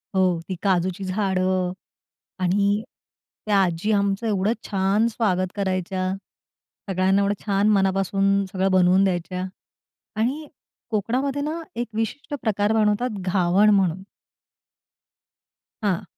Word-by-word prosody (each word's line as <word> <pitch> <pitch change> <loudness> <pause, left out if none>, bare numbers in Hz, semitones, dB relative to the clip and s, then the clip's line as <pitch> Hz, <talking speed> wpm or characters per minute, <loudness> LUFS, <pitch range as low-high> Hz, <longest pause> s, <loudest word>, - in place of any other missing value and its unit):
हो, 185 -3 +2
ती 185 - -2
काजूची 185 0 +1
झाडं 185 -2 0 0.7
आणि 200 +3 +2 0.6
त्या 205 -2 +3
आजी 180 +4 -1
आमचं 200 +2 +1
एवढं 205 +1 +1
छान 200 +3 +2
स्वागत 195 -5 0
करायच्या, 185 -1 -1 0.8
सगळ्यांना 190 +1 +2
एवढं 200 +1 +1
छान 200 +1 +2
मनापासून 195 0 +2
सगळं 190 0 +1
बनवून 185 +1 +4
द्यायच्या 180 0 -1 0.8
आणि 290 +6 -1 0.4
कोकणामध्ये 255 +6 -1
ना, 315 +3 -3
एक 240 +1 -2
विशिष्ट 225 +6 -3
प्रकार 210 -1 +1
बनवतात 215 +1 +1
घावण 185 +2 +3
म्हणून. 190 -3 +2 1.8
हां. 200 -1 0
195 Hz, 110 wpm, -23 LUFS, 185-215 Hz, 1.8 s, बनवून